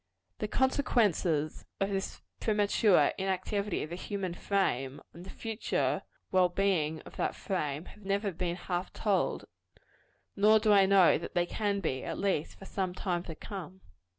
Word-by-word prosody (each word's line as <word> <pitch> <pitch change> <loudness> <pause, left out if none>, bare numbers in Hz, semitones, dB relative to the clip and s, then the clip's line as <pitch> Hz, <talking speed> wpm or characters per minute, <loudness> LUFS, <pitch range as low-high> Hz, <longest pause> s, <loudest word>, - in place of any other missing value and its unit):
The 210 - -1
consequences 210 - +1 0.2
of 195 +1 0
this 195 -1 -3 0.2
premature 205 -6 +3
inactivity 195 +1 -1
of 155 - -7
the - - -3
human 185 -1 -4
frame, 145 -9 0
on 170 - -11
the 185 - -10
future 225 -1 -1 0.3
well 185 -1 +4
being 175 -5 +1
of - - -13
that - - -1
frame, 155 -5 -2
have 210 - -14
never 200 +1 0
been 175 0 -2
half 180 0 -3
told: 205 -3 0 0.9
nor 210 +2 +6
do 215 -1 +4
I 195 -1 +6
know 195 -3 +6
that 170 - -8
they 175 -1 +3
can 200 +1 -1
be 130 -7 -2
at - - -4
least 195 -6 -1
for 195 - -11
some 185 -2 -2
time 180 -3 -1
to 165 - -6
come. 190 0 -8
190 Hz, 160 wpm, -31 LUFS, 175-200 Hz, 0.9 s, nor